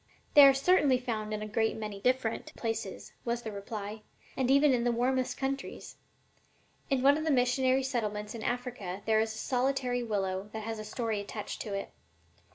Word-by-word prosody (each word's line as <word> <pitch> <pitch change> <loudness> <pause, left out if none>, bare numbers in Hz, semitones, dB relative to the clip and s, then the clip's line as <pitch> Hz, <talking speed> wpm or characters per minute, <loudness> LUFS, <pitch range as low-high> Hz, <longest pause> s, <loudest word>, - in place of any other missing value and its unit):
"They 285 -1 +10
are 275 - +7
certainly 280 -2 +4
found 220 -4 -3
in 215 0 -3
a - - -4
great 220 +1 0
many 210 -2 -5
different 250 -2 0
places," 225 -4 -4
was 235 0 -2
the 220 - -4
reply, 205 +1 -6 0.3
"and 260 -2 0
even 280 +1 +5
in 240 -1 +1
the 240 - +2
warmest 255 +2 0
countries. 275 0 -4 0.9
In 265 -2 +1
one 285 +2 +5
of - - -3
the 320 - 0
missionary 260 0 +3
settlements 210 -5 -2
in 230 - -6
Africa 235 -6 -4
there 220 -1 +3
is 220 0 0
a - - -8
solitary 250 0 0
willow 195 -3 -2
that 220 -1 -5
has 225 0 -4
a - - -5
story 220 0 -2
attached 205 +1 -6
to 205 -2 -4
it. 195 - -4
235 Hz, 185 wpm, -30 LUFS, 215-260 Hz, 0.9 s, They